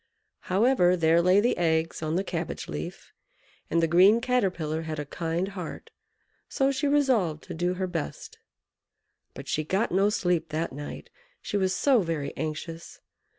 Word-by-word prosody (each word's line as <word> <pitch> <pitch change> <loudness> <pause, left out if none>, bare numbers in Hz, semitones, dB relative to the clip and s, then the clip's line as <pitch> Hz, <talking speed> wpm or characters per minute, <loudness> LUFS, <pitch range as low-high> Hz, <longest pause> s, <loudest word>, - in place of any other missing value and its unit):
However, 185 -2 +3
there 165 0 +4
lay 180 +3 +5
the 235 +4 +2
eggs 160 -1 0
on 155 0 -1
the 190 - +1
cabbage 170 -3 -4
leaf; 75 0 -7 0.6
and 165 +1 +2
the - - +4
green 185 +7 +6
Caterpillar 185 -11 0
had 160 -1 -5
a 150 - -4
kind 165 +5 -2
heart, 185 -5 -8 0.6
so 270 0 +1
she 275 +2 -1
resolved 255 - +2
to - - -8
do 175 +2 -1
her 190 +1 -2
best. 170 -4 -5 1.0
But - - -9
she 155 - -1
got 190 +8 0
no 195 +3 +3
sleep 175 -5 0
that 155 0 -2
night, 145 +2 -8 0.3
she - - -5
was 190 -1 +1
so 260 +2 +3
very 160 -5 -3
anxious. 160 +2 -6
175 Hz, 160 wpm, -27 LUFS, 160-200 Hz, 1.0 s, green